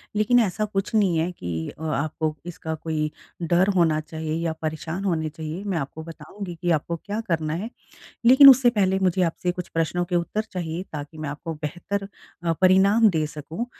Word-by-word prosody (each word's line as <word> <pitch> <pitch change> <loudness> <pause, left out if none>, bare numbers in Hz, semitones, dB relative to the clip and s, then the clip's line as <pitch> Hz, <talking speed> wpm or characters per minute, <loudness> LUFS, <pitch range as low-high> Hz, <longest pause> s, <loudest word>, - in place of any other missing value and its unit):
लेकिन 220 +4 +4
ऐसा 215 0 +1
कुछ 200 +1 -3
नहीं 195 -6 +3
है 165 +3 0
कि 85 - -5
अ, 160 - -11
आपको 155 +1 -1
इसका 170 -2 -5
कोई 155 -1 -2 0.3
डर 175 +3 +3
होना 165 -4 +3
चाहिए 160 0 -5
या 165 -1 0
परेशान 160 +3 -4
होने 160 -4 0
चाहिए। 160 +4 -6
मैं 195 -4 -2
आपको 155 +2 -5
बताऊँगी 165 +3 -8
कि 175 - 0
आपको 165 +1 0
क्या 205 +5 -5
करना 160 -4 0
है। 195 +8 -3 0.6
लेकिन 265 +3 +10
उससे 255 -2 +6
पहले 190 -4 +1
मुझे 185 -1 +1
आपसे 175 +1 0
कुछ 180 -1 -6
प्रश्नों 165 +2 -1
के 175 0 -1
उत्तर 175 +5 -1
चाहिए, 175 -2 -3
ताकि 150 +1 -7
मैं 155 -2 -4
आपको 160 +3 -5
बेहतर 195 +6 -3 0.4
अ, 165 - +2
परिणाम 195 +4 +5
दे 160 -3 0
सकूँ। 155 - -6
170 Hz, 185 wpm, -24 LUFS, 155-195 Hz, 0.6 s, लेकिन